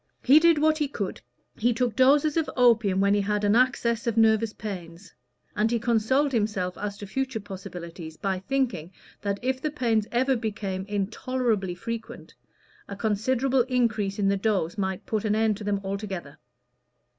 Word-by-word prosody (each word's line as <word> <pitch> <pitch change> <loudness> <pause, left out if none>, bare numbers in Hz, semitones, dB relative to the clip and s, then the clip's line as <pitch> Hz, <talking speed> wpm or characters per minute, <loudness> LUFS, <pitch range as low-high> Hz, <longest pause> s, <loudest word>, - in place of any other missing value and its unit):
He 275 +4 +7
did 335 0 +5
what 310 +1 +2
he 295 - +1
could: 205 -8 -5 0.3
he 235 +1 +1
took 240 -2 0
doses 285 +4 +4
of 325 -2 0
opium 225 -6 +4
when 200 0 +3
he 205 - +2
had 210 +1 -1
an 205 +1 +3
access 235 -1 +1
of 230 -1 0
nervous 220 0 +4
pains, 185 -4 -8 0.4
and 215 +2 +2
he 235 - +1
consoled 235 +5 +1
himself 205 -6 -1
as 200 0 -5
to 205 - -7
future 260 +3 -3
possibilities 175 -5 -8
by 190 -2 -2
thinking 190 - -2 0.3
that 200 -1 -1
if 260 0 -1
the 305 - -1
pains 230 -7 0
ever 260 +2 +2
became 200 -5 -3
intolerably 210 -1 -1
frequent, 230 +4 -7 0.5
a 200 - -6
considerable 250 +5 +1
increase 220 -6 0
in 200 -2 +1
the 200 0 +2
dose 195 -5 0
might 190 -2 -3
put 215 -2 -2
an 210 -1 +1
end 220 -1 +2
to 210 - -8
them 205 -1 0
altogether. 195 -6 -5
215 Hz, 170 wpm, -26 LUFS, 195-250 Hz, 0.5 s, He